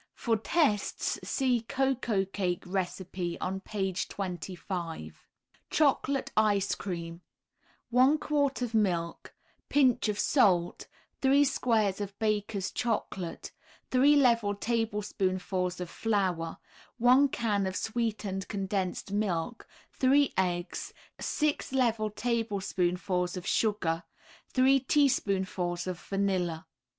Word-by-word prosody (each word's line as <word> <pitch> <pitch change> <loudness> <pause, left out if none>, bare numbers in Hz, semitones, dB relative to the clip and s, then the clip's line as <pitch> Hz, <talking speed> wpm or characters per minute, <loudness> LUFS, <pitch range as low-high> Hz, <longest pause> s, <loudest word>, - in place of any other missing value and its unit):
For 230 -2 +1
tests 220 - 0
see 255 -4 +1
Cocoa 255 -7 +1
Cake 185 -2 -2
recipe 180 -1 -3
on 190 +1 -2
page 190 -2 -2
25. 175 - -5 0.4
CHOCOLATE 280 -2 +1
ICE 205 -2 +3
CREAM 170 -2 -5 0.7
1 260 +5 +5
quart 285 -4 0
of 235 -2 -3
milk, 175 -6 -1 0.3
Pinch 255 -6 +3
of 205 - -1
salt, 180 - +2 0.3
3 280 +2 +5
squares 220 -7 +1
of 200 -1 -5
Baker's 205 -3 -1
Chocolate, 200 -7 -3 0.4
3 275 +3 +5
level 230 -7 +3
tablespoonfuls 195 -5 -1
of 180 - -4
flour, 185 -5 -1 0.4
1 250 +4 +6
can 210 -7 0
of 185 - -4
sweetened 215 -4 -2
condensed 195 -2 -2
milk, 200 +1 -2 0.3
3 275 +2 +3
eggs, 175 -1 -2 0.2
6 300 -3 -1
level 230 -5 +2
tablespoonfuls 190 -5 -1
of 180 - -6
sugar, 185 -8 +1 0.5
3 265 +1 +4
teaspoonfuls 190 - +1
of 185 -2 -4
vanilla. 185 -5 -1
205 Hz, 100 wpm, -29 LUFS, 185-240 Hz, 0.7 s, 1